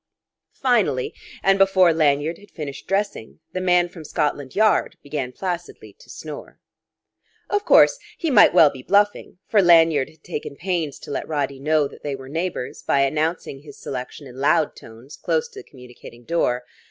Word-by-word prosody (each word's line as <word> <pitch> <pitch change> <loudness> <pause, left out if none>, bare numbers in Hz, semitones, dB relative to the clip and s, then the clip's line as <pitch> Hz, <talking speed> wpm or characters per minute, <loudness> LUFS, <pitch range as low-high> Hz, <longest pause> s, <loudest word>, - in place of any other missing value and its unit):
Finally, 220 - +1 0.3
and 195 0 +3
before 190 -3 +5
Lanyard 155 +1 +1
had 205 - -18
finished 145 -4 -8
dressing, 195 - -2 0.2
the 185 - -3
man 180 -1 +3
from 170 -2 -12
Scotland 145 -3 -2
Yard 215 +1 +2
began 140 -3 -4
placidly 175 +4 -6
to - - -18
snore. - - -9 0.9
Of 410 +1 0
course, - - +5 0.2
he 330 -4 -1
might 230 - +7
well 160 -4 +6
be 130 - -10
bluffing; 205 +4 +1
for 210 - +4
Lanyard 165 -6 +5
had 155 0 -23
taken 150 -4 -6
pains 170 -4 -3
to - - -9
let - - -4
Roddy 140 -3 -2
know 150 +1 +1
that - - -15
they 145 -2 -3
were 135 0 -11
neighbours, 165 -4 -4
by 140 - +1
announcing 155 +1 -1
his 145 0 -14
selection 130 +2 -7
in 130 -1 -12
loud 145 +2 +2
tones 115 +5 -13
close 475 0 -1
to 410 - -11
the - - -14
communicating 125 -2 -14
door. 125 -4 0
155 Hz, 170 wpm, -22 LUFS, 140-185 Hz, 0.9 s, might